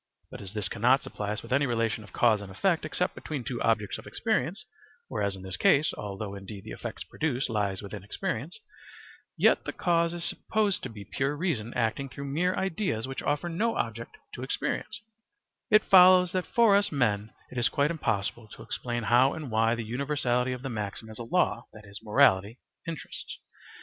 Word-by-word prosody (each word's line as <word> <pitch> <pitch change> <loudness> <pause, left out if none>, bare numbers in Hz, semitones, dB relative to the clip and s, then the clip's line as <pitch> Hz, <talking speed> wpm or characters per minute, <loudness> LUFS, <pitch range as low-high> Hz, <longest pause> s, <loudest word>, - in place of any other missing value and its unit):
But - - -8
as 95 -2 -8
this 105 -2 -1
cannot 125 +4 +3
supply 105 -1 -5
us 105 - -4
with 115 - -4
any 140 +1 +3
relation 115 -2 0
of 105 - -15
cause 110 -4 +3
and 100 -2 -8
effect 170 - +1
except 180 - -1
between 145 -5 -5
two 120 +1 -4
objects 110 -3 +1
of - - -12
experience, - - -1 0.4
whereas 100 -1 -1
in 95 - -10
this 95 0 -5
case, 145 +8 +4
although 100 0 -5
indeed 100 0 -8
the - - -9
effect - - -6
produced 135 -6 -1
lies 100 -3 -1
within 100 -1 -7
experience, 115 - -4 0.8
yet - - +4
the - - -3
cause 170 -1 +1
is 170 - -4
supposed 210 -3 0
to 130 - -5
be 105 -3 -10
pure 135 +6 -1
reason 140 - -1
acting 120 +4 0
through 140 +2 -7
mere 180 +4 +1
ideas 185 - -1
which 135 - -5
offer 145 +4 -1
no 215 +8 0
object 115 0 -4 0.2
to - - -7
experience, 215 - -3 0.7
it 215 0 +6
follows 180 -1 +7
that 185 -1 -1
for 230 -4 +5
us 205 0 +3
men 110 -7 0 0.2
it 125 - -3
is 120 - +3
quite 145 +1 +1
impossible 110 -7 -2
to - - -11
explain 120 -1 -3
how 125 +4 +4
and 150 -6 -6
why 115 +1 +3
the 115 -1 -4
universality 125 0 0
of 125 0 -5
the 135 - -3
maxim 110 -1 -5
as 110 - -11
a - - -4
law, 120 -2 +1
that 110 -1 -13
is, 100 0 -10
morality, 105 0 +4 0.3
interests. 165 -2 -6
120 Hz, 195 wpm, -28 LUFS, 110-160 Hz, 0.8 s, follows